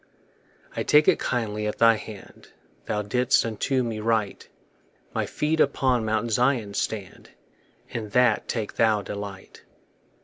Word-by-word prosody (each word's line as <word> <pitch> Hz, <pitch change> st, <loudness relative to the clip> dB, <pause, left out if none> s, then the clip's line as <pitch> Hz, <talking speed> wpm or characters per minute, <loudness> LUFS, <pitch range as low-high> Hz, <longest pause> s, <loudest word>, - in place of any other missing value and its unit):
I -, -, -2 dB
take 150 Hz, +1 st, +4 dB
it -, -, +4 dB
kindly 105 Hz, -3 st, -2 dB
at 105 Hz, -, -3 dB
thy 115 Hz, 0 st, +6 dB
hand 110 Hz, -2 st, -10 dB, 0.4 s
Thou 105 Hz, 0 st, -1 dB
didst 125 Hz, +5 st, +2 dB
unto 125 Hz, +4 st, -1 dB
me 115 Hz, -2 st, -3 dB
write; 110 Hz, -2 st, -1 dB, 0.6 s
My -, -, -1 dB
feet 155 Hz, +2 st, -1 dB
upon 130 Hz, -4 st, +2 dB
Mount 110 Hz, +2 st, -1 dB
Zion 120 Hz, -3 st, +1 dB
stand, 100 Hz, -2 st, -4 dB, 0.6 s
In 110 Hz, -2 st, -5 dB
that 125 Hz, +4 st, +2 dB
take 110 Hz, -3 st, -4 dB
thou 110 Hz, -2 st, +3 dB
delight. 100 Hz, -1 st, -8 dB
110 Hz, 135 wpm, -25 LUFS, 105-125 Hz, 0.6 s, thy